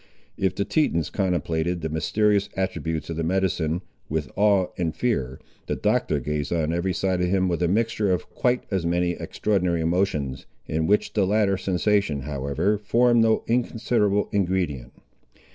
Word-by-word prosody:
If 95 -1 0
the 100 - -1
Tetons 85 - +1
contemplated 85 -2 -1
the 80 - -2
mysterious 100 +6 +1
attributes 85 -4 -2
of 80 - -4
the 80 - -1
medicine, 90 -1 0 0.3
with 75 -4 -2
awe 100 -3 +3
and 85 -3 -2
fear, 65 - -1 0.3
the - - -1
Doctor - - +1
gazed 75 -1 -3
on 80 -2 0
every 85 +2 0
side 90 0 0
of 90 - +1
him, 95 0 +2
with 85 -1 -1
a 90 - +3
mixture 110 +1 +1
of 90 - -1
quite 125 0 +1
as 95 -3 0
many 85 +1 +1
extraordinary 90 -2 -1
emotions, 80 -6 -1 0.2
in 80 0 -1
which 105 +1 +2
the 100 -3 +2
latter 100 -1 +2
sensation, 95 -4 0
however, 70 +9 -1
formed 120 +3 +3
no 110 -1 +3
inconsiderable 115 -3 +1
ingredient. 90 -10 -1
90 Hz, 160 wpm, -24 LUFS, 80-100 Hz, 0.3 s, awe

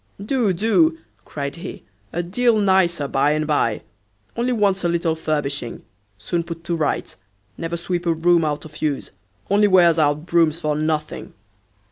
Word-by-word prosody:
"Do, 240 -4 +1
do;" 230 - +2 0.3
cried 140 +1 -5
he, 170 - -8 0.3
"a 175 - -2
deal 230 +6 +2
nicer 190 -7 +2
by 140 +2 +2
and 155 0 -1
by. 145 -8 0 0.5
Only 240 +2 0
wants 200 -5 +1
a - - +2
little 170 -1 +1
furbishing; 145 -6 -3 0.3
soon 170 - -2
put 165 -1 -8
to 170 - -2
rights. 155 -3 -2 0.4
Never 165 +5 -4
sweep 175 0 -3
a 165 - +3
room 170 +1 +3
out 150 -1 -2
of 155 0 -12
use; 150 -3 -2 0.4
only 205 +1 +5
wears 175 -4 +5
out 150 +1 +1
brooms 165 -2 +2
for 150 -3 -1
nothing." 155 0 -3
170 Hz, 160 wpm, -21 LUFS, 155-190 Hz, 0.5 s, only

